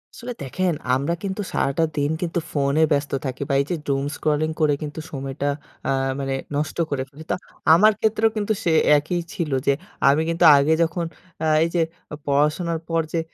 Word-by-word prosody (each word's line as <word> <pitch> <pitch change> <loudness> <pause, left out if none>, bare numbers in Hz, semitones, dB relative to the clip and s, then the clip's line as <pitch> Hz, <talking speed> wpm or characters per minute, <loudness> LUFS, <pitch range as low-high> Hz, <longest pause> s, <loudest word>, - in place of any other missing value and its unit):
আসলে 245 0 -6
দেখেন 180 +6 -1 0.2
আমরা 140 +6 0
কিন্তু 195 +1 -3
সারাটা 140 +4 +1
দিন 145 +1 +1
কিন্তু 170 0 -1
ফোনে 140 +1 +1
ব্যস্ত 145 0 +1
থাকি 130 0 -4
বা 140 - +1
এই - - -3
যে, - - +1
Doom 135 0 0
scrolling 155 +1 0
করে 150 -1 +4
কিন্তু 150 0 -5
সময়টা 135 0 -3 0.4
আ - - 0 0.3
মানে 135 -1 -2 0.2
নষ্ট 155 +2 -2
করে 135 -2 -1
ফেলি। 150 +3 -12
তো - - +2 0.4
আমার 210 +6 +7
ক্ষেত্রেও 220 0 +2
কিন্তু 215 +1 0
সে 170 - +2 0.3
একই 155 +5 -1
ছিল 160 -5 -3 0.2
যে, 140 - +5 0.4
আমি 145 +3 +3
কিন্তু 165 +1 +2
আগে 140 +3 +3
যখন 165 +1 -1 0.4
আ - - +1 0.2
এই 165 - 0
যে, 170 - +3 0.4
পড়াশোনার 150 +4 +1
পর 165 0 +2
যে, 165 - +1
155 Hz, 185 wpm, -23 LUFS, 140-170 Hz, 0.4 s, আমার